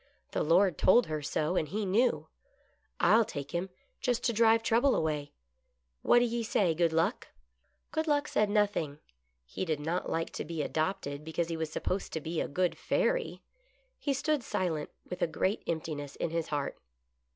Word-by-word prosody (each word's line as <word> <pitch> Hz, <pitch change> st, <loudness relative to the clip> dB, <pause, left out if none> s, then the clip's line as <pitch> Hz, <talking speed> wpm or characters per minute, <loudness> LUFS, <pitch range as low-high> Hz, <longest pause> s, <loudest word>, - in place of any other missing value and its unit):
The -, -, -1 dB
Lord 175 Hz, +1 st, +3 dB
told 240 Hz, +5 st, +6 dB
her 155 Hz, -1 st, -3 dB
so, 155 Hz, +4 st, -1 dB
and 155 Hz, -, +1 dB
he 205 Hz, +7 st, -2 dB
knew. 230 Hz, +6 st, +2 dB, 0.7 s
I'll 230 Hz, +1 st, +5 dB
take 140 Hz, -10 st, -6 dB
him, 175 Hz, +2 st, -2 dB, 0.3 s
just 245 Hz, -2 st, 0 dB
to 235 Hz, -, +1 dB
drive 225 Hz, 0 st, +4 dB
trouble 240 Hz, +5 st, +3 dB
away. 150 Hz, -2 st, -1 dB, 0.7 s
What -, -, +5 dB
do 240 Hz, -, +5 dB
ye 235 Hz, 0 st, -1 dB
say. 200 Hz, -6 st, +2 dB
Good 170 Hz, 0 st, +2 dB
Luck? 160 Hz, +1 st, 0 dB, 0.3 s
" -, -, -45 dB
Good 315 Hz, +1 st, -1 dB
Luck 290 Hz, -1 st, +2 dB
said 210 Hz, -1 st, +1 dB
nothing. 205 Hz, -9 st, +1 dB, 0.5 s
He 60 Hz, -, -4 dB
did 160 Hz, -5 st, -1 dB
not 165 Hz, +4 st, -2 dB
like 165 Hz, 0 st, -1 dB
to -, -, -4 dB
be 160 Hz, -2 st, -3 dB
adopted 155 Hz, -3 st, -2 dB
because 160 Hz, +2 st, -2 dB
he 165 Hz, -, -2 dB
was 160 Hz, -1 st, -3 dB
supposed 185 Hz, +4 st, -2 dB
to 160 Hz, -, -1 dB
be 160 Hz, +1 st, -3 dB
a -, -, -2 dB
good 180 Hz, +4 st, 0 dB
fairy. -, -, 0 dB, 0.6 s
He 285 Hz, -, -1 dB
stood 300 Hz, +1 st, 0 dB
silent 170 Hz, -9 st, -2 dB, 0.2 s
with 180 Hz, -, -6 dB
a -, -, +3 dB
great 190 Hz, +5 st, -1 dB
emptiness 155 Hz, -3 st, -3 dB
in 160 Hz, -, -2 dB
his 165 Hz, -1 st, -1 dB
heart. 145 Hz, -2 st, -3 dB
175 Hz, 185 wpm, -31 LUFS, 155-225 Hz, 0.7 s, told